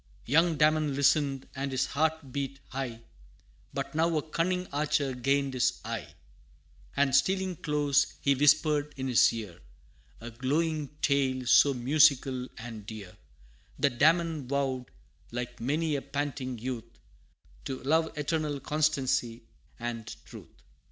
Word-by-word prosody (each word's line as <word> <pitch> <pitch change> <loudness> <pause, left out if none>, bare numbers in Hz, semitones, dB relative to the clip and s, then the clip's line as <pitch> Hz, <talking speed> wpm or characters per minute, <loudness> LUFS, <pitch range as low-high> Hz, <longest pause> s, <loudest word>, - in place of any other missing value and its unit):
Young 160 +4 +3
Damon 150 -1 +3
listened, 140 -1 +2
and 135 +1 -3
his 130 - +1
heart 155 -2 -1
beat 140 0 -4
high 130 -4 -5 0.7
But - - -4
now 160 +1 +2
a 155 - -3
cunning 180 +3 0
archer 145 -2 0
gained 135 +2 0
his 125 -2 +1
eye - - -5 0.8
And 140 -2 +3
stealing 190 +3 +2
close, 145 -2 +1
he 140 - +3
whispered 145 +1 +3
in 130 0 -3
his 125 -2 +5
ear, 105 -7 -7 0.6
A 120 +1 -8
glowing 150 +5 -1 0.2
tale, 135 -3 +1
so 140 +3 +5
musical 130 -1 +3
and 115 -2 -8
dear, 105 -5 -9 0.6
That 130 -4 0
Damon 160 -4 +3
vowed, 135 -2 -1 0.4
like 125 +1 -5
many 150 +5 0
a 140 - -2
panting 135 -3 -4
youth, 115 -1 -6 0.7
To 130 -1 -5
Love, 160 +3 +1
eternal 150 -1 -1
constancy 135 -6 0 0.4
and 115 -2 -5
truth! - - -14
140 Hz, 130 wpm, -29 LUFS, 125-155 Hz, 0.8 s, his